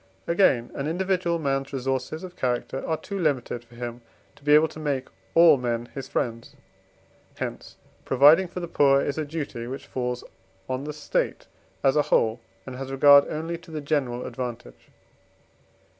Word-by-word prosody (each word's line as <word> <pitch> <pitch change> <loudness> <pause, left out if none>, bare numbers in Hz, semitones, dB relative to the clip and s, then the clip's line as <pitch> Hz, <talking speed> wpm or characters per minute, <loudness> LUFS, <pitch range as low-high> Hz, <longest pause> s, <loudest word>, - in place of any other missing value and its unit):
Again, 150 -9 +3
an 140 - -3
individual 180 0 0
man's 135 -3 -1
resources 135 +4 -3
of 180 -1 -9
character 125 +1 -2
are 160 - 0
too 200 +4 -6
limited 130 -7 -1
for 120 0 -19
him 120 0 -6 0.3
to - - -22
be 150 +1 +5
able 155 +1 +6
to 155 - -10
make 140 -4 -2 0.3
all 165 -3 +8
men 120 -1 -2
his 135 -2 -6
friends. 115 -4 -3 0.8
Hence - - -6 0.3
providing 150 +8 +6
for 180 +1 -6
the 170 - -4
poor 140 -4 +4
is 140 +2 -2
a 155 - -1
duty, 145 -6 -5
which 135 +2 -6
falls 125 -1 -3 0.4
on 130 +2 -3
the 150 - -4 0.2
State - - -1 0.4
as 135 +1 +4
a 150 - +5
whole, 110 +1 +2 0.3
and 130 -1 -7
has 135 0 -6
regard 140 +1 +7
only 165 +2 -4
to 170 - -17
the 155 -1 -4
general 140 -5 -1
advantage. 120 - -7
140 Hz, 170 wpm, -25 LUFS, 125-155 Hz, 0.8 s, all